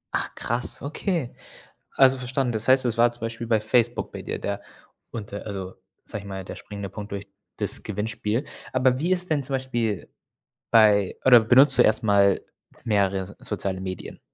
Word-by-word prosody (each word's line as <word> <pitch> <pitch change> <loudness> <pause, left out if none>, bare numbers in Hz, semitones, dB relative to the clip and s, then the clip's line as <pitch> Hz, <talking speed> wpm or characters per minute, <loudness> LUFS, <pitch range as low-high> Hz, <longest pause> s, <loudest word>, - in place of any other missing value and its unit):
Ach - - -2
krass, 120 +2 -3
okay. 155 - -2 0.6
Also 135 -1 +5
verstanden. 125 0 -1
Das 110 0 -3
heißt, 130 0 +5
es 115 -1 -1
war 120 +1 +5
zum 120 - -13
Beispiel 115 +1 -5
bei 110 -2 +2
Facebook 120 +2 +1
bei - - -8
dir, - - -5
der 100 0 -3 0.5
unter 105 -2 -7
also, 95 -2 -6 0.3
sage 105 - -6
ich - - -9
mal, 95 -1 -6
der - - -8
springende 100 -2 -7
Punkt 105 -1 -8
durch 100 0 -5 0.3
das - - +2
Gewinnspiel. 105 +4 -2 0.3
Aber 130 0 +2
wie 170 +6 0
ist 180 -1 -2
denn 145 -3 +1
zum 135 +1 -4
Beispiel 120 -7 -2 0.6
bei 105 -4 +4
oder 125 -3 +9
benutzt 130 +5 +6
du - - +7
erst 110 +3 +3
mal 100 -2 +4 0.4
mehrere 100 -3 +1
so 100 - -12
soziale 95 -3 -3
Medien? 95 -1 -7
115 Hz, 180 wpm, -24 LUFS, 100-130 Hz, 0.6 s, oder